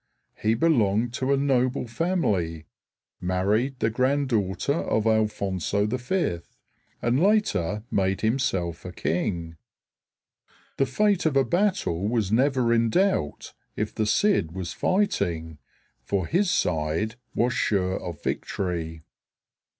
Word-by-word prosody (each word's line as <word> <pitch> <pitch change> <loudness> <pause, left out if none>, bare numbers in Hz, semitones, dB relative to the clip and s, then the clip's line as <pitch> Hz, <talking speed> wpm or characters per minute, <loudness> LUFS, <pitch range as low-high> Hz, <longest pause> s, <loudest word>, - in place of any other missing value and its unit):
He 110 +1 +2
belonged 115 -5 +2
to 130 +2 -1
a 140 - +4
noble 130 -2 +1
family, 105 - -1 0.5
married 100 +9 0
the 110 - +1
granddaughter 130 -3 0
of 110 -8 0
Alfonso 105 -3 +1
V, 125 - -1 0.6
and 120 +5 +2
later 170 - +1
made 95 -1 +1
himself 95 -8 0
a 90 - -6
king. 85 -1 -2 1.2
The 135 - +2
fate 200 - +2
of 140 -3 +1
a 135 - +4
battle 175 - 0
was 110 -4 0
never 130 0 +3
in 115 0 +3
doubt 185 - 0 0.2
if - - -2
the 110 - -1
Cid 105 - +2
was 90 -2 -5
fighting; 85 - 0 0.4
for 95 +8 -1
his 185 - +1
side 80 - 0 0.2
was 120 +2 +2
sure 95 -7 0
of 85 -4 -7
victory. 80 -4 -3
110 Hz, 120 wpm, -25 LUFS, 90-135 Hz, 1.2 s, a